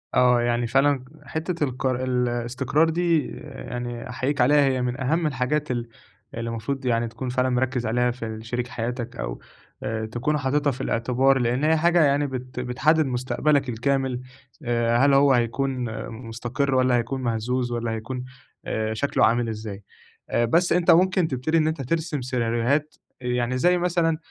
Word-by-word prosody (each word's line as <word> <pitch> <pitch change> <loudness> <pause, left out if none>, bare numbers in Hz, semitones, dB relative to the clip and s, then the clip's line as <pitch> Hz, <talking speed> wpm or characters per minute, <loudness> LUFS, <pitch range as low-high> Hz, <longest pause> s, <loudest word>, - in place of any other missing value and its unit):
آه، 125 -1 +5
يعني 120 0 0
فعلًا 135 +2 +2 0.2
حتّة 165 +1 -3
القر 130 -1 -1
الإستقرار 125 +4 +1
دي 170 -2 +1
يعني 120 -3 -6
أحيّيك 130 +3 -1
عليها 145 +3 +5
هي 130 -1 +1
من 125 0 -2
أهَم 160 +5 +1
الحاجات 145 +1 -1
ال 120 -1 -3 0.4
اللي 115 0 -4
المفروض 120 +4 -4
يعني 115 -1 +1
تكون 125 +3 -5
فعلًا 125 +1 +1
مركّز 125 0 0
عليها 125 +2 +1
في 120 -1 -6
ال 110 0 -6
شريك 120 +1 -3
حياتك 120 0 -4
أو - - -5 0.4
آآ 110 0 -2
تكون 120 +7 -1
حاططها 145 +1 +1
في 130 +1 -7
الإعتبار، 130 +3 +2
لإن 125 +3 0
هي 160 +1 +4
حاجة 170 +1 +4
يعني 145 0 +2
بت 130 -1 -6
بتحدّد 150 +6 +2
مستقبلك 130 +2 0
الكامل 130 +1 0 0.4
آآ 120 -1 +1
هل 140 +3 +4
هو 140 0 +5
هيكون 125 +2 0 0.3
مستقر 120 +4 -2
والّا 130 -1 +3
هيكون 120 +3 -2
مهزوز 120 +1 -1
والّا 120 -1 -2
هيكون 125 +3 -5 0.4
آآ 110 0 -1
شكله 140 +6 +2
عامل 115 +1 +2
إزاي؟ 105 -2 -6 0.5
آآ 120 - +2
بَس 170 +9 +3
أنت 175 0 +4
ممكن 180 0 +4
تبتدي 140 +4 0
إن 155 -1 +3
أنت 155 -2 -2
ترسم 155 +1 -2
سيناريوهات، 125 +4 0 0.3
آآ 125 - -5
يعني 125 +1 0
زَيّ 180 +7 +3
مثلًا 170 -2 +1
125 Hz, 165 wpm, -24 LUFS, 120-145 Hz, 0.5 s, آه